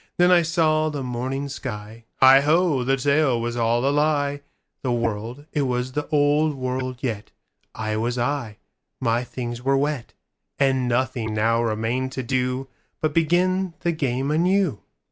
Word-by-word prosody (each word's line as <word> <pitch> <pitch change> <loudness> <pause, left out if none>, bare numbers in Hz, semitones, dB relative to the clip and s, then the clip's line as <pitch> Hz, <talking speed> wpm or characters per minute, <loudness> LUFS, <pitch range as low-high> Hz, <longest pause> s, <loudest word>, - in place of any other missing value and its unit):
Then 175 +1 +5
I 175 -1 +6
saw 155 -2 +2
the 145 -3 -4
morning 130 +3 -3
sky:Heigho, 130 - +2
the 135 +2 +1
tale 140 -2 +2
was 120 +1 -3
all 120 +1 +1
a - - +3
lie; 145 -1 +1 0.4
The 130 - -1
world, 115 +3 -3
it 150 - +1
was 125 -1 -1
the 150 +2 -3
old 150 +1 +2
world 130 -1 -3
yet,I 110 -1 -6
was 120 +3 -1
I, 120 -4 -2 0.4
my 120 0 +1
things 120 -1 -6
were 135 +2 +2
wet, 145 -3 -2 0.4
And 130 -2 +2
nothing 120 -3 -1
now 115 +2 +2
remained 115 +3 -1
to 130 - -3
doBut 130 +4 -3
begin 180 +2 +1
the 175 - +1
game 135 -3 -1
anew. 175 - +1
130 Hz, 145 wpm, -23 LUFS, 120-150 Hz, 0.4 s, I